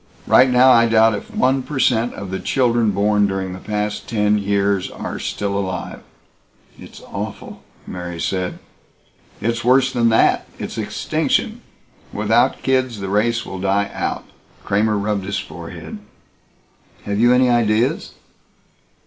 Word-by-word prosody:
Right 130 +1 +5
now 125 +1 +6
I 115 -1 +5
doubt 115 0 +4
if 105 - -6
one 130 +1 +1
per 145 +2 -6
cent 120 -2 +1
of 100 -2 -7
the 95 - -3
children 120 -4 +1
born 105 +1 +2
during 95 -1 -3
the 90 - -8
past 105 0 -3
ten 105 -2 +2
years 100 -1 0
are - - -6
still 100 -1 -3
alive." 95 -2 -4 0.8
"It's - - -12
awful!" - - -7 0.2
Mary 90 -2 -6
said. 95 +1 -2 0.8
"It's 115 +1 -1
worse 130 +2 +3
than 120 -2 +2
that. 110 - +3
It's - - -6
extinction. - - -1 0.5
Without 115 +5 +1
kids 130 -4 0
the 95 -1 -4
race 115 +4 +1
will 95 - -7
die 100 +1 0
out." - - -3 0.4
Kramer 105 +1 +1
rubbed 100 -1 -2
his 100 +1 -2
forehead. - - -8 1.1
"Have 100 0 -2
you 120 +2 +5
any 125 0 +4
ideas?" 115 0 +1
105 Hz, 140 wpm, -20 LUFS, 100-120 Hz, 1.1 s, now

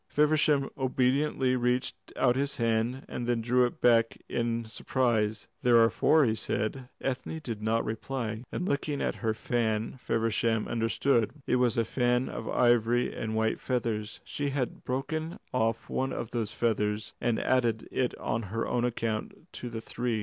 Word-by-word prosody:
Feversham 150 -2 +3
obediently 130 0 +2
reached 125 +1 0 0.2
out 125 -2 +3
his 140 +1 -1
hand, 115 +3 0
and 120 - -4
then 120 -1 +2
drew 125 +2 +3
it - - -10
back 115 -1 +4
in 115 -1 -1
surprise. 110 0 0
"There 120 -1 +5
are 115 0 +6
four," 155 -2 +4
he 110 - +2
said. 110 +3 -2
Ethne 135 +4 -3
did 115 -8 -5
not 110 +1 +1
reply, 115 0 -3
and 180 - -2
looking 140 -1 -1
at - - -1
her 110 -2 0
fan 115 0 -1
Feversham 115 -1 0
understood. 115 0 +1 0.2
It - - +2
was 125 -2 +2
a 115 - +2
fan 125 +2 +1
of 110 - -5
ivory 120 0 +3
and 110 0 -3
white 110 0 +1
feathers. 110 -4 -2
She 145 -1 -3
had 135 -3 -3
broken 155 +6 -3 0.2
off 115 -2 0
one 135 0 -1
of 115 - -4
those 115 -3 -2
feathers 105 -1 0
and 120 -2 +1
added 120 -4 +1
it 125 -2 0
on 115 - -1
her 115 +2 -2
own 120 - 0
account 115 +6 -3
to 125 - -6
the 115 -1 -5
three. 120 -1 -2
120 Hz, 165 wpm, -29 LUFS, 115-130 Hz, 0.2 s, are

